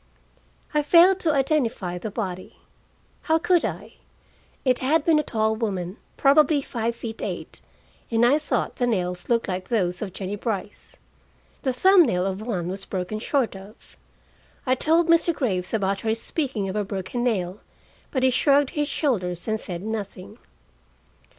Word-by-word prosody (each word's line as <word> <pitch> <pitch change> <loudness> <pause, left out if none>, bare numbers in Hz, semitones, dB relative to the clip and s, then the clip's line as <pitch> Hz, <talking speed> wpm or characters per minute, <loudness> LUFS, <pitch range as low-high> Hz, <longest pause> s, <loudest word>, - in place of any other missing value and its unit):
I 300 - +3
failed 350 +5 +6
to 330 -4 +1
identify 255 - 0
the 215 - -4
body. 185 -4 -5 0.7
How 320 - +5
could 350 +1 +2
I? - - -5 0.7
It 255 -1 +3
had 295 +4 +2
been 320 -2 +4
a - - 0
tall 220 -4 0
woman, 195 -4 -3 0.2
probably 285 +1 +4
five 235 -2 -2
feet 225 -1 -7
eight, - - -5 0.5
and 230 0 +3
I 280 +5 +4
thought 300 - -2
the 245 - +1
nails 180 -5 -2
looked 235 -1 +2
like 185 -1 -3
those 180 -6 0
of 205 -3 -4
Jennie 195 +1 -4
Brice. 205 -2 -5 0.6
The 265 - 0
thumb 375 +8 +6
nail 180 -4 0
of 195 +1 -3
one 200 -7 -3
was 190 +2 -5
broken 190 +3 -4
short 250 -2 0
off. 195 +3 -14 0.7
I 255 - +3
told 325 +6 +2
Mr. 335 0 +3
Graves 185 -10 -1
about 195 -3 0
her 220 0 0
speaking 235 -4 -2
of 190 - -4
a 210 - 0
broken 200 +5 -4
nail, 195 -5 -1 0.5
but 260 -2 -1
he 260 - +5
shrugged 280 +2 +3
his 295 -3 -1
shoulders 185 - -1
and 220 0 0
said 175 -3 -5
nothing. 210 -1 -6
225 Hz, 165 wpm, -24 LUFS, 195-280 Hz, 0.7 s, failed